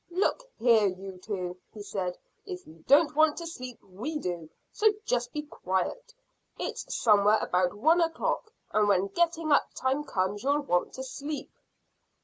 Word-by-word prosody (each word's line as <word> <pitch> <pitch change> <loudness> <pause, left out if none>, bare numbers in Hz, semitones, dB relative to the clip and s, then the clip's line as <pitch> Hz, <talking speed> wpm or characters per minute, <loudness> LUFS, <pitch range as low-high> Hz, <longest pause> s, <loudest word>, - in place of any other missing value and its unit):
"Look 405 +7 0
here, 225 -3 +5
you 190 0 -6
two," 180 -2 -4 0.2
he 210 - -7
said; 185 -3 -3 0.3
"if 180 0 -7
you 160 +1 -16
don't 290 +2 +5
want 310 0 +4
to 340 - -5
sleep 255 -7 -7
we 220 +12 -5
do, 175 - -4 0.2
so 435 - +3 0.2
just 240 0 0
be 300 - -3
quiet. 290 - -3 0.5
It's - - -4
somewhere 210 -1 +5
about 180 -1 +1
one 320 +11 +4
o'clock, 385 +7 -1 0.2
and 210 -1 +3
when 195 -1 +3
getting 330 - +1
up 285 - +4
time 265 +3 0
comes 200 -5 -1
you'll 285 +3 +2
want 180 -11 0
to 260 - -5
sleep." 285 +3 -5
240 Hz, 160 wpm, -29 LUFS, 190-300 Hz, 0.5 s, here